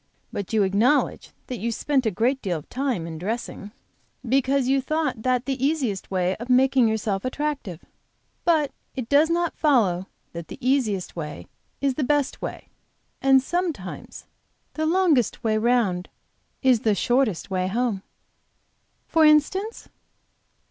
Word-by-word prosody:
But 200 - -4
you 220 -2 +3
acknowledge 215 +10 +2 0.2
that 250 -3 -5
you 230 +4 -1
spent 265 +1 0
a - - +4
great 240 +7 0
deal 180 -5 -1
of 150 - -11
time 255 -10 -2
in 160 -1 -7
dressing 210 +1 -4 0.6
because 270 +1 +2
you 270 +1 +3
thought 310 -4 -1
that 250 +1 +1
the 270 -1 -2
easiest 270 -10 0
way 185 -1 0
of 235 +3 -8
making 255 -1 +4
yourself 215 -3 -1
attractive. 265 - -3 0.6
But 315 -4 +2 0.2
it 250 -3 -5
does 295 +3 +5
not 345 0 0
follow 200 - +2 0.3
that 170 -1 -7
the - - -9
easiest 240 -8 0
way 150 - -6 0.4
is 275 -1 +2
the 285 - -2
best 290 0 0
way, - - -6 0.5
and 270 -1 +5
sometimes 330 - -4 0.5
the 315 0 -1
longest 325 - +2
way 220 -1 +1
round 215 -6 +1 0.5
is 255 -3 +5
the 215 -1 +1
shortest 240 -6 0
way 185 -1 0
home." 220 -1 -1 1.0
"For 325 - +3
instance?" 315 +9 +2
250 Hz, 145 wpm, -24 LUFS, 200-280 Hz, 1.0 s, does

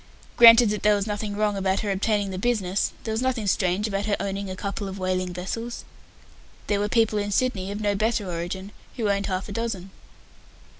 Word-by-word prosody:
Granted 230 -1 +8
that 210 - -2
there 210 0 +4
was 200 -1 -1
nothing 210 -1 -3
wrong 210 -1 +1
about 190 0 0
her 205 - -1
obtaining 200 0 0
the 185 - -4
business, 200 -4 0
there 220 - -3
was 220 +2 -1
nothing 255 -4 -1
strange 190 +1 +1
about 200 0 -2
her 205 - +2
owning 200 0 -3
a 185 - -4
couple 200 +1 -4
of 195 0 -6
whaling 185 -1 -1
vessels. 230 +7 -5 0.8
There 205 -1 0
were 205 +1 -1
people 220 -2 +2
in 205 0 -2
Sydney, 205 -3 0
of 205 +1 -4
no 205 -1 +1
better 215 0 0
origin, 180 +3 -4 0.3
who 215 -4 +1
owned 200 0 -1
half 185 0 -2
a - - -7
dozen. 200 -4 -4
205 Hz, 205 wpm, -25 LUFS, 190-215 Hz, 0.8 s, Granted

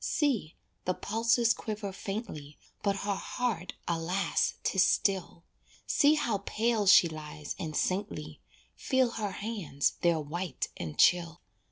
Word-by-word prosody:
See, 250 - 0 0.3
the 185 - 0
pulses 230 +2 +2
quiver 210 -3 -5
faintly, 185 -9 -6 0.2
But 200 -1 +1
her 205 - +1
heart, 205 -2 -3
alas! 170 +2 0
'tis 190 - +3
still; 190 -5 +1 0.4
See 300 0 +4
how 230 -9 0
pale 220 +1 0
she 185 -2 +8
lies 150 -2 -7
and 155 -3 -4
saintly, 200 +3 -2 0.4
Feel 260 -2 +1
her 210 -4 -3
hands, 200 -10 -2
they're 170 -2 +3
white 155 +1 -4
and 80 -3 -6
chill. 170 -1 +3
195 Hz, 130 wpm, -30 LUFS, 165-225 Hz, 0.4 s, she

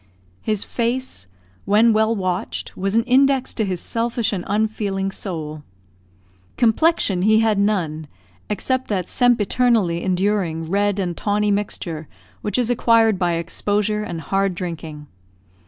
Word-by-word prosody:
His 215 -2 -1
face, 235 - -2 0.4
when 220 +3 +4
well 220 +1 +2
watched, 185 -3 -3
was 195 +2 -2
an 230 - +4
index 265 +1 +3
to 220 - -1
his 185 -3 -2
selfish 230 +1 -1
and 185 -3 -3
unfeeling 200 -2 -1
soul. 155 -6 -6 1.0
Complexion 230 - +2
he 220 +3 +4
had 220 -3 +2
none, 170 -7 0 0.4
except 255 +6 -1
that 190 -4 -2
sempiternally 230 -6 +2
enduring 185 -4 0
red 200 +2 +1
and 180 -3 -2
tawny 210 +2 0
mixture 170 -6 -3 0.3
which 210 +1 -2
is 245 -1 +1
acquired 225 -4 +3
by 175 -1 +1
exposure 205 +5 -1
and 170 -6 -5
hard 195 +4 0
drinking. 160 -4 -6
205 Hz, 130 wpm, -21 LUFS, 180-225 Hz, 1.0 s, when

